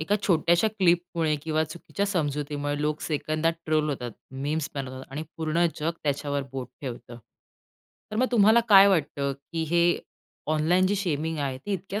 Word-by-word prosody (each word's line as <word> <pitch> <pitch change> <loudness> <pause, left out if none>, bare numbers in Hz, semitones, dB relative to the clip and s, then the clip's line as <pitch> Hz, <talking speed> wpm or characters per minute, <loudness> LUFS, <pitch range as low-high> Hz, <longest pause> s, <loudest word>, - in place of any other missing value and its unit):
एका 180 +6 +1
छोट्याश्या 175 +3 +3
क्लिपमुळे 170 -5 +1
किंवा 155 0 0
चुकीच्या 175 +5 -4
समजुतीमुळे 145 -5 -2
लोक 150 0 -1
सेकंदात 155 +1 0
ट्रोल 155 -1 +2
होतात, 125 -4 -4 0.2
मीम्स 145 +3 -2
बनवतात 130 -1 -5
आणि 150 +3 -3
पूर्ण 165 +2 +1
जग 160 +2 +1
त्याच्यावर 145 -1 -1
बोट 130 -2 -5
ठेवतं. 120 -3 -7 0.9
तर 215 - -4
मग 255 +3 +3
तुम्हाला 220 +1 +6
काय 195 -2 +9
वाटतं, 145 -6 0
की 140 +4 -5
हे 170 0 +3 0.6
ऑनलाईन 175 +5 +3
जी 200 - +1
शेमिंग 160 -4 -1
आहे 135 -3 -2
ती 205 - -1
इतक्या 195 +2 -3
155 Hz, 155 wpm, -26 LUFS, 145-175 Hz, 0.9 s, काय